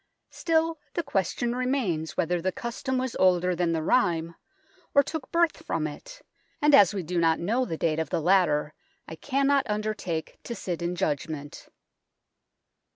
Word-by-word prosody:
Still, 325 -1 0 0.2
the 340 - 0
question 235 - -1
remains 250 - -1
whether 175 +1 0
the 185 +2 0
custom 235 +5 -3
was 255 -1 -2
older 180 -1 +3
than 170 -1 0
the 160 -1 -1
rhyme, 170 -5 +1 0.6
or 280 - +7
took 300 -2 -6
birth 335 -2 +1
from 160 -2 -2
it, 155 - -9 0.4
and 295 0 +3
as 205 -10 +8
we 195 -3 -3
do 175 +2 -2
not 165 -1 +3
know 230 +9 0
the 165 - -4
date 160 -1 0
of 160 -3 -2
the - - 0
latter 155 -4 +2 0.3
I - - -8
cannot 275 - +1
undertake 210 -6 -3
to 235 - -5
sit 175 -4 -4
in 175 +1 -2
judgment. 145 -2 -4
185 Hz, 160 wpm, -27 LUFS, 165-260 Hz, 0.6 s, as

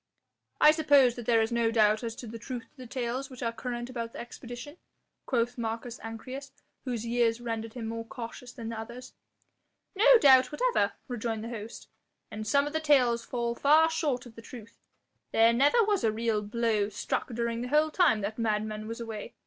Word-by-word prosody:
"I 300 - +8
suppose 285 -5 +4
that 240 -2 -9
there 230 -2 +4
is 220 - -3
no 235 -1 +2
doubt 215 -1 +3
as 230 -1 -4
to 245 - -8
the 230 0 -8
truth 245 +1 -6
of - - -36
the 255 -1 -9
tales 255 +2 -3
which 255 -2 -9
are 230 - 0
current 240 +1 -5
about 235 -2 -5
the - - -8
expedition," 245 +5 -9 0.5
quoth 240 0 0
Marcus 230 +1 -4
Ancyrus, 255 +5 -7 0.4
whose 235 -3 -3
years 235 -1 +1
rendered 225 -2 -4
him 235 -3 -5
more 230 +1 -4
cautious 240 +1 -8
than 230 -3 -7
the 225 -1 -5
others. 245 +3 -9 0.8
"No - - +7
doubt 260 - +6
whatever," - - +1
rejoined 230 -3 -3
the 230 - -5
host, 225 -1 -8 0.4
"and 215 0 -6
some 280 +6 +3
of 295 - -5
the 315 - +1
tales 255 -6 +3
fall 235 -1 -2
far 310 +6 +4
short 290 -6 -1
of 240 - -12
the 230 - -11
truth. 225 -1 -12 0.5
There 225 +1 +5
never 290 - +4
was 415 -2 +1
a 220 - +3
real 220 -1 0
blow 215 -1 0
struck 205 0 -3
during 235 0 -2
the 250 - -3
whole 305 +3 +2
time 305 - +3
that 215 +3 -4
madman 215 -1 -1
was 230 +1 -6
away. 225 -3 -7
235 Hz, 195 wpm, -29 LUFS, 225-260 Hz, 0.8 s, I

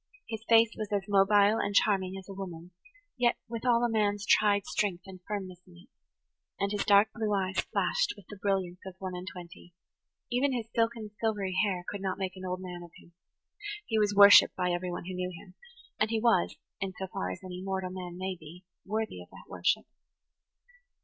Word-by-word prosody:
His 220 -1 -6
face 230 -1 +6
was 215 -1 -5
as 200 -2 0
mobile 205 +2 +4
and 205 - -2
charming 195 -2 +2
as 190 - -10
a 195 - -7
woman's, 180 -3 -8 0.5
yet 240 -1 +3
with 230 +1 -5
all 235 -1 +4
a - - +4
man's 205 -2 0
tried 205 -2 +4
strength 185 -4 -1
and 190 -1 -11
firmness 190 -4 -5
in 175 -1 -17
it, 175 - -18 0.7
and 200 0 0
his 205 -1 0
dark 205 +1 +6
blue 220 -2 -2
eyes 190 -1 -1
flashed - - 0
with 205 - -14
the 205 - -10
brilliance 190 -3 -1
of 190 - -8
one 190 -1 -5
and 180 +1 -7
twenty; 175 -1 -12 0.6
even 260 +3 +2
his 235 -3 -3
silken 230 -2 0
silvery 205 -4 -1
hair 185 -4 -1
could 205 - -5
not 190 -1 -2
make 190 -1 -3
an 185 - -9
old 185 0 -3
man 180 -1 -7
of 175 - -11
him. 170 - -19 0.7
He 220 -1 0
was 205 -1 +2
worshipped 200 0 +9
by 180 -1 0
everyone 175 0 -3
who 185 - -5
knew 180 0 -2
him, 180 +1 -12 0.5
and 215 - +2
he 225 -1 0
was, 225 -6 +2 0.2
in 195 -1 -3
so 190 - -3
far 90 - -4
as 90 - -5
mortal 185 0 -4
man 180 -1 -7
may 185 0 -3
be, 170 +2 -13 0.2
worthy 220 +2 -2
of - - -13
that - - -14
worship. - - 0
195 Hz, 200 wpm, -30 LUFS, 185-210 Hz, 0.7 s, worshipped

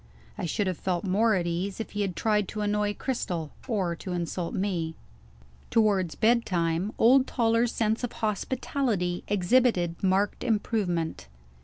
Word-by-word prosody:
I - - -3
should 200 +6 0
have 185 -3 -2
felt 180 -2 -1
more 210 +3 +3
at 175 -2 0
ease, 180 +4 -2
if 225 - -5
he 205 - -2
had 190 -3 -1
tried 210 -1 +1
to 215 - -4
annoy 210 0 0
Cristel, 180 - -3 0.2
or 190 -8 0
to 185 - -5
insult 175 0 -3
me. 175 -5 -1 0.7
Towards 200 -6 +2
bedtime, 190 -6 +1
old 255 +3 +5
Toller's 230 -1 +2
sense 220 +1 0
of 245 - -3
hospitality 215 -3 -1
exhibited 190 -3 +2
marked 195 +1 +1
improvement. 200 - -1
200 Hz, 145 wpm, -27 LUFS, 175-225 Hz, 0.7 s, old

